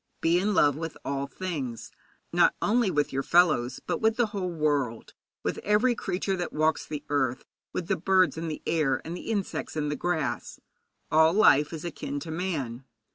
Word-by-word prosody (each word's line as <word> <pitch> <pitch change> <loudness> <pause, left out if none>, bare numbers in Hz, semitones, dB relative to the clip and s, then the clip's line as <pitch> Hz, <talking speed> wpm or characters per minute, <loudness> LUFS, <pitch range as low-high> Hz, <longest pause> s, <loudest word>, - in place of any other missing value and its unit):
Be 170 +2 +3
in 205 +2 0
love 145 -5 +4
with 160 +1 -5
all 140 0 -2
things, 140 -7 -5 0.4
not - - +4
only 230 0 +2
with 145 -5 0
your 135 - 0
fellows, 155 -7 +3
but - - -2
with 220 0 +3
the 240 - +4
whole 190 -3 -2
world, 145 -8 -1 0.3
with - - -2
every 215 +5 +3
creature 195 -3 -2
that 175 -1 -3
walks 155 +1 +1
the 150 -1 -5
earth, 130 -3 0 0.3
with 175 - -4
the - - +1
birds 185 +1 +3
in 165 +1 -4
the 155 - -5
air, 150 -5 +1
with 165 - -5
the 180 - -7
insects 205 -7 -3
in 150 -1 -1
the 150 - -1
grass. 160 -6 -2 0.5
All 160 +1 +5
life 150 -8 +5
is 160 0 -6
akin 145 -3 -4
to 160 - -6
man. 150 -8 -3
160 Hz, 185 wpm, -27 LUFS, 145-185 Hz, 0.5 s, All